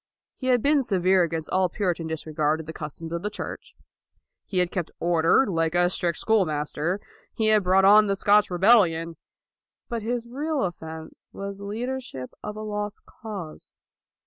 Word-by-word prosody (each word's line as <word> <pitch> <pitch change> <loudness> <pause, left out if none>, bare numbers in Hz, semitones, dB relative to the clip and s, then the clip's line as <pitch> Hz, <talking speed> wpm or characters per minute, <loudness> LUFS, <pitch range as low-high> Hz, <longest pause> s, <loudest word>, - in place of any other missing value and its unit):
He 255 - -5
had 245 -3 +3
been 290 0 +4
severe 190 -5 +2
against 165 -2 -2
all 185 -1 +2
Puritan 175 -3 -2
disregard 155 -1 -1
of 160 - -7
the 160 - -7
customs 160 +2 -7
of 170 0 -3
the 210 - -2
Church. 210 - -7 0.7
He 190 - -5
had 180 -1 +2
kept 175 -4 -3
order, 170 +8 +3
like 165 -3 0
a 175 0 +3
strict 170 -3 -1
school 220 -3 +3
master. 155 +3 -2 0.4
He 220 -1 +1
had 215 -1 +5
brought 190 +1 +4
on 210 +2 +7
the 200 - +1
Scotch 205 +1 +4
rebellion. 175 -4 +3 0.7
But 235 -2 -3
his 235 +2 -2
real 290 +3 -2
offense 160 -3 -7
was 200 0 -6
leader 240 +6 -3
ship 130 - -8
of 210 - -6
a 215 - -6
lost 210 -1 -4
cause. 200 -8 -9
190 Hz, 170 wpm, -25 LUFS, 165-215 Hz, 0.7 s, on